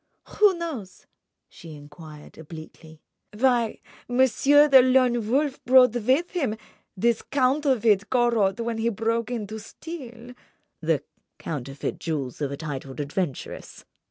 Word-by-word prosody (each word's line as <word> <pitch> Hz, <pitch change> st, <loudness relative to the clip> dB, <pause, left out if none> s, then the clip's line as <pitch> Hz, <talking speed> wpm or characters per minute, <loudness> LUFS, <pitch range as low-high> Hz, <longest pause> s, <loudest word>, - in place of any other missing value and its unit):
"Who 410 Hz, -4 st, +5 dB
knows," 285 Hz, -, -7 dB, 0.4 s
she 165 Hz, -2 st, -12 dB
enquired, 150 Hz, +1 st, -13 dB
obliquely, 160 Hz, 0 st, -12 dB, 0.3 s
"why 240 Hz, -2 st, +1 dB, 0.3 s
Monsieur 265 Hz, +4 st, +4 dB
the 270 Hz, -3 st, +8 dB
Lone 250 Hz, -3 st, +2 dB
Wolf 280 Hz, +2 st, 0 dB
brought 250 Hz, -2 st, +6 dB
with 255 Hz, +9 st, +1 dB
him 265 Hz, -, -2 dB, 0.4 s
this 235 Hz, +3 st, +1 dB
counterfeit 255 Hz, -7 st, +1 dB
Corot 235 Hz, -5 st, +2 dB
when 230 Hz, -1 st, -3 dB
he 230 Hz, +1 st, +1 dB
broke 230 Hz, +1 st, -1 dB
in 235 Hz, -4 st, -3 dB
to 215 Hz, +2 st, -7 dB
steal—" 245 Hz, -1 st, -10 dB, 0.5 s
"The -, -, 0 dB, 0.3 s
counterfeit 135 Hz, -2 st, -5 dB
jewels 145 Hz, -5 st, -4 dB
of 140 Hz, -2 st, -2 dB
a 140 Hz, -, -5 dB
titled 140 Hz, -3 st, -7 dB
adventuress!" 145 Hz, 0 st, -5 dB
230 Hz, 125 wpm, -25 LUFS, 165-260 Hz, 0.5 s, the